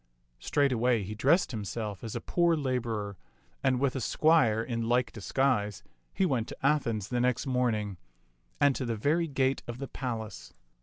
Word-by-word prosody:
Straightway 125 Hz, -, +2 dB
he 100 Hz, +3 st, -5 dB
dressed 140 Hz, -, +3 dB
himself 105 Hz, -2 st, -4 dB
as 115 Hz, -, -5 dB
a -, -, -3 dB
poor 170 Hz, -1 st, +2 dB
laborer, 115 Hz, -, -2 dB, 0.5 s
and 130 Hz, -2 st, +2 dB
with 140 Hz, -1 st, +1 dB
a 130 Hz, -, -2 dB
squire 130 Hz, -5 st, +3 dB
in 115 Hz, -1 st, -2 dB
like 120 Hz, -1 st, +2 dB
disguise 105 Hz, -2 st, 0 dB, 0.3 s
he 190 Hz, -, +1 dB
went 125 Hz, -9 st, 0 dB
to -, -, -8 dB
Athens 115 Hz, -8 st, +1 dB
the 125 Hz, -1 st, 0 dB
next 125 Hz, +1 st, +1 dB
morning, 115 Hz, -7 st, 0 dB, 0.6 s
and 145 Hz, -2 st, +4 dB
to -, -, -2 dB
the 115 Hz, -1 st, -1 dB
very 155 Hz, +10 st, +1 dB
gate 135 Hz, -2 st, +1 dB
of 120 Hz, 0 st, -5 dB
the 135 Hz, +1 st, -5 dB
palace. 115 Hz, -6 st, -6 dB
125 Hz, 165 wpm, -29 LUFS, 110-135 Hz, 0.6 s, and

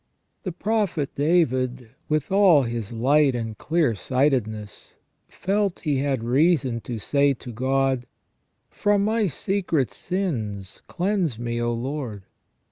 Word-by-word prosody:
The 185 Hz, -, -4 dB
prophet 195 Hz, -6 st, -1 dB
David, 130 Hz, -6 st, +1 dB, 0.2 s
with 155 Hz, 0 st, 0 dB
all 190 Hz, -7 st, +6 dB
his 115 Hz, -3 st, -4 dB
light 135 Hz, +4 st, +3 dB
and 115 Hz, -2 st, -3 dB
clear 155 Hz, -1 st, +1 dB
sightedness, 110 Hz, -3 st, -1 dB, 0.3 s
felt 200 Hz, 0 st, -1 dB
he 145 Hz, -5 st, 0 dB
had 135 Hz, -4 st, -1 dB
reason 130 Hz, -1 st, +2 dB
to 115 Hz, +2 st, -5 dB
say 140 Hz, +5 st, +2 dB
to 120 Hz, 0 st, -9 dB
God: 130 Hz, +1 st, 0 dB, 0.3 s
" -, -, -49 dB
From 205 Hz, -1 st, +3 dB
my 220 Hz, -1 st, +1 dB
secret 170 Hz, -4 st, -1 dB
sins 110 Hz, -, -4 dB
cleanse 180 Hz, -, -1 dB
me, 120 Hz, 0 st, -3 dB
O 120 Hz, 0 st, 0 dB
Lord 120 Hz, -4 st, -4 dB
135 Hz, 125 wpm, -24 LUFS, 120-175 Hz, 0.3 s, all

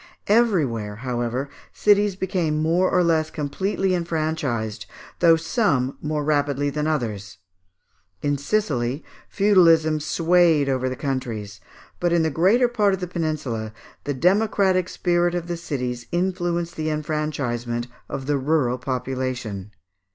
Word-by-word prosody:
Everywhere, 155 Hz, -, +2 dB
however, 120 Hz, +2 st, -2 dB, 0.3 s
cities 205 Hz, -1 st, +3 dB
became 180 Hz, -5 st, -1 dB
more 170 Hz, +4 st, +2 dB
or 180 Hz, -, +3 dB
less 160 Hz, -2 st, +2 dB
completely 190 Hz, +6 st, -1 dB
enfranchised, 155 Hz, -, -2 dB, 0.3 s
though 165 Hz, -2 st, +6 dB
some 160 Hz, -, 0 dB
more 150 Hz, 0 st, -2 dB
rapidly 145 Hz, -1 st, +1 dB
than 150 Hz, +1 st, -2 dB
others. 105 Hz, -10 st, -3 dB, 0.9 s
In 145 Hz, 0 st, +1 dB
Sicily, 140 Hz, -, -1 dB, 0.3 s
feudalism 165 Hz, -6 st, +4 dB
swayed 165 Hz, -1 st, +3 dB
over 130 Hz, -1 st, 0 dB
the 130 Hz, -, -4 dB
countries; 115 Hz, -8 st, -4 dB, 0.4 s
but 175 Hz, -1 st, +1 dB
in 170 Hz, -1 st, +3 dB
the 160 Hz, -, 0 dB
greater 200 Hz, -, +4 dB
part 210 Hz, -5 st, +2 dB
of -, -, -11 dB
the 180 Hz, -, -3 dB
peninsula, 150 Hz, -11 st, -3 dB, 0.3 s
the 145 Hz, -, -2 dB
democratic 185 Hz, +2 st, +2 dB
spirit 175 Hz, -1 st, +1 dB
of 175 Hz, -1 st, -2 dB
the 175 Hz, 0 st, -3 dB
cities 125 Hz, -7 st, -4 dB
influenced 175 Hz, -1 st, -1 dB
the 155 Hz, 0 st, -1 dB
enfranchisement 145 Hz, -6 st, -2 dB, 0.2 s
of 135 Hz, -, -5 dB
the 145 Hz, 0 st, 0 dB
rural 130 Hz, -3 st, +1 dB
population. 125 Hz, -6 st, -3 dB
155 Hz, 130 wpm, -23 LUFS, 130-175 Hz, 0.9 s, though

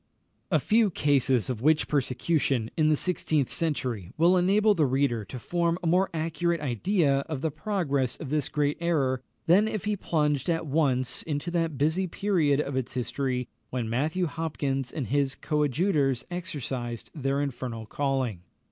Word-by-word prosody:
A -, -, +4 dB
few 220 Hz, -1 st, +3 dB
cases 135 Hz, -, +2 dB
of 125 Hz, -4 st, -3 dB
witch 155 Hz, +3 st, +3 dB
persecution 135 Hz, -3 st, 0 dB
in 155 Hz, -1 st, +3 dB
the 155 Hz, -, +4 dB
sixteenth 155 Hz, -4 st, 0 dB
century 125 Hz, -, -2 dB
will 170 Hz, +3 st, +5 dB
enable 200 Hz, +4 st, +4 dB
the 160 Hz, -7 st, +2 dB
reader 130 Hz, -4 st, +1 dB
to 130 Hz, -, -7 dB
form 170 Hz, +6 st, 0 dB
a 180 Hz, -, -8 dB
more 180 Hz, +3 st, +3 dB
accurate 165 Hz, +1 st, -1 dB
idea 145 Hz, -, +1 dB
of 150 Hz, -4 st, -3 dB
the 160 Hz, -, 0 dB
progress 145 Hz, -, -1 dB
of 145 Hz, -5 st, -7 dB
this 150 Hz, -3 st, 0 dB
great 145 Hz, -1 st, 0 dB
error 140 Hz, -7 st, +1 dB, 0.2 s
than 185 Hz, +6 st, +5 dB
if 215 Hz, -3 st, -3 dB
he 210 Hz, 0 st, +1 dB
plunged 150 Hz, -5 st, 0 dB
at 165 Hz, -1 st, 0 dB
once 135 Hz, -4 st, +1 dB
into 150 Hz, +2 st, -3 dB
that 165 Hz, -4 st, -1 dB
busy 160 Hz, +7 st, +1 dB
period 165 Hz, -7 st, +1 dB
of 140 Hz, -2 st, -2 dB
its 130 Hz, 0 st, -3 dB
history 125 Hz, 0 st, -2 dB, 0.2 s
when 120 Hz, -3 st, -3 dB
Matthew 155 Hz, +9 st, 0 dB
Hopkins 145 Hz, -5 st, -2 dB
and 145 Hz, -, -3 dB
his 140 Hz, +1 st, 0 dB
coadjutors 150 Hz, -3 st, +1 dB
exercised 130 Hz, -9 st, -4 dB
their 140 Hz, -2 st, -1 dB
infernal 125 Hz, -5 st, -4 dB
calling. 130 Hz, -7 st, -1 dB
145 Hz, 160 wpm, -27 LUFS, 130-170 Hz, 0.2 s, will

